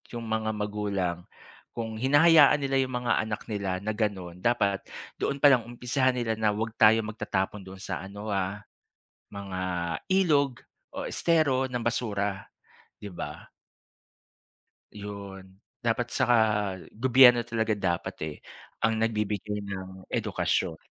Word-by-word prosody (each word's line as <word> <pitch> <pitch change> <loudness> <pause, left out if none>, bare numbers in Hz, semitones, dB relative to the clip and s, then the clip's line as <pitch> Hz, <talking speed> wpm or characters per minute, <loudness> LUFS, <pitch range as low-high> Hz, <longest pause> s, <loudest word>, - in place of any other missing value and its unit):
'yong 115 - -4
mga 110 -1 -1
magulang, 100 -4 -2 0.5
kung 115 -2 -4
hinahayaan 145 +3 +6
nila 135 0 +1
'yong 130 -1 -1
mga 120 - +2
anak 110 -1 -3
nila 100 -2 -2
na 110 - -1
gano'n, 95 -5 -3
dapat 100 -3 +1 0.4
doon 140 - 0
palang 130 -5 +6
umpisahan 125 +2 0
nila 115 -3 -1
na 105 -1 +2
wag 110 +1 -2
tayo 110 +1 +6
magtatapon 105 -2 -3
doon 95 0 -10
sa - - -3
ano, 100 +2 -7
ah, 100 +1 -2 0.7
mga 95 -2 -5 0.5
ilog 145 -9 +2 0.3
o - - -4
estero 150 -6 +2
ng 125 -2 -3
basura, 105 -4 -2 0.6
'di 100 - -6
ba. 90 - -8 1.4
'Yon. 100 -2 -9 0.2
Dapat, 120 +1 0
saka 120 0 +3 0.6
gobyerno 125 -1 +7
talaga 110 -2 0
dapat, 85 -3 -2
eh, 75 -1 -6 0.5
ang 115 0 +2
nagbibigay 105 -2 -1
ng 95 -1 -7
edukasyon. 80 - -1
110 Hz, 125 wpm, -27 LUFS, 100-120 Hz, 1.4 s, gobyerno